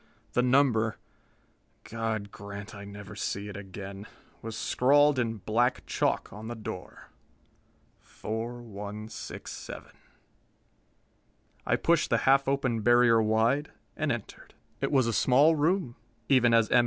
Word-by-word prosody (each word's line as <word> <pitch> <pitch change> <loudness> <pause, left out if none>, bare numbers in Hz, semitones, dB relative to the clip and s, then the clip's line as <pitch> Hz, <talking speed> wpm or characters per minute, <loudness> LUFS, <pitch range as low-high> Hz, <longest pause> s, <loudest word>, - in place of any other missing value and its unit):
The 125 - +3
number 125 -4 +3 0.9
God 110 -3 -3
grant 100 +1 -8
I 100 0 -9
never 100 -1 -10
see 100 +1 -3
it 100 - -8
again! 100 +1 -8 0.3
was 115 0 -6
scrawled 145 +2 +3
in 115 -2 -1
black 115 +5 0
chalk - - -1
on 105 +2 -8
the 120 - -5
door 105 -4 -8 0.9
4167. 110 -2 -7 1.8
I - - +3
pushed - - +2
the - - +3
half 135 +1 +4
open 130 -5 0
barrier 120 0 +5
wide, 115 +7 +2 0.3
and 155 -1 -1
entered. 120 -2 -7 0.3
It 135 - 0
was 135 -4 +4
a 115 - 0
small 135 +9 +4
room, 155 -4 0 0.3
even 125 -3 +5
as 115 -1 +4
M. 125 - +6
115 Hz, 125 wpm, -28 LUFS, 105-130 Hz, 1.8 s, M